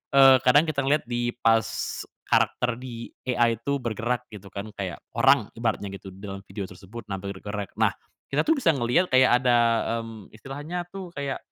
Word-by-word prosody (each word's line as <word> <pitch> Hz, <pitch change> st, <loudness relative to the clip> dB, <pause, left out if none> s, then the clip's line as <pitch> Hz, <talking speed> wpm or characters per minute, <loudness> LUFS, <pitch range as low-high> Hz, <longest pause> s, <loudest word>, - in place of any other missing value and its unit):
eee, 135 Hz, -1 st, +9 dB
kadang 145 Hz, +4 st, +7 dB
kita 155 Hz, -3 st, -1 dB
ngeliat 150 Hz, +2 st, +3 dB
di 120 Hz, 0 st, -1 dB
pas 115 Hz, -2 st, +3 dB, 0.6 s
karakter 125 Hz, -1 st, +2 dB
di 120 Hz, -2 st, -8 dB, 0.2 s
AI 115 Hz, -2 st, +2 dB
itu 140 Hz, +4 st, -1 dB
bergerak 120 Hz, +1 st, -2 dB
gitu 100 Hz, -2 st, -10 dB
kan, 100 Hz, +2 st, -6 dB
kayak 95 Hz, -3 st, -5 dB
orang 135 Hz, -6 st, +4 dB
ibaratnya 110 Hz, -4 st, -2 dB
gitu 95 Hz, -, -10 dB
dalam 100 Hz, 0 st, -7 dB
video 100 Hz, +1 st, -5 dB
tersebut 95 Hz, +6 st, -10 dB
nampil 100 Hz, 0 st, -4 dB
bergerak. 100 Hz, 0 st, -6 dB
Nah, -, -, +3 dB, 0.4 s
kita 145 Hz, -, +1 dB
tuh 320 Hz, -, +5 dB
bisa 175 Hz, -11 st, +4 dB
ngeliat 135 Hz, +7 st, +1 dB
kayak 130 Hz, -1 st, +5 dB
ada, 120 Hz, -1 st, +5 dB, 0.5 s
mmm, 110 Hz, -3 st, -11 dB
istilahnya 145 Hz, +10 st, -6 dB
tuh 185 Hz, -2 st, -8 dB
kayak, 140 Hz, -1 st, -3 dB
120 Hz, 170 wpm, -26 LUFS, 105-135 Hz, 0.6 s, eee